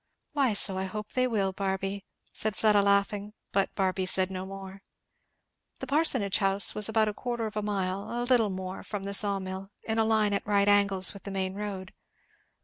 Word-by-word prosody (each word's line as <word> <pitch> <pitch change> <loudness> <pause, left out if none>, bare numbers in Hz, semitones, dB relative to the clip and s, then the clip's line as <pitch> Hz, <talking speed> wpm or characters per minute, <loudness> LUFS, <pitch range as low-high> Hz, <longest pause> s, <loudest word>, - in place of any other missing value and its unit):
"Why, 275 -6 +2
so 190 -2 +4
I 190 - -2
hope 210 +2 -6
they 255 0 +1
will, 200 -5 0
Barby," 195 0 -3 0.3
said 215 -1 -1
Fleda 210 -2 +4
laughing. 200 +1 +1 0.2
But 195 -1 +1
Barby 190 -1 0
said 185 0 +1
no 185 0 -5
more. 195 0 -9 1.0
The - - -6
parsonage 265 -8 +2
house 195 0 +4
was 210 0 +1
about 220 -1 +2
a 210 - -2
quarter 240 0 -4
of 215 - -6
a 210 - -1
mile, 195 -2 -2
a 240 0 -2
little 245 -4 +3
more, 185 0 -6
from 205 -2 -6
the 200 0 -4
saw 200 0 +3
mill, 190 0 -6
in 220 0 -1
a - - +4
line 220 -2 +2
at 200 - -1
right 200 -1 +2
angles 200 -2 +4
with 200 - -11
the 200 - -8
main 190 -1 -2
road. 195 -2 -6
200 Hz, 200 wpm, -28 LUFS, 190-215 Hz, 1.0 s, so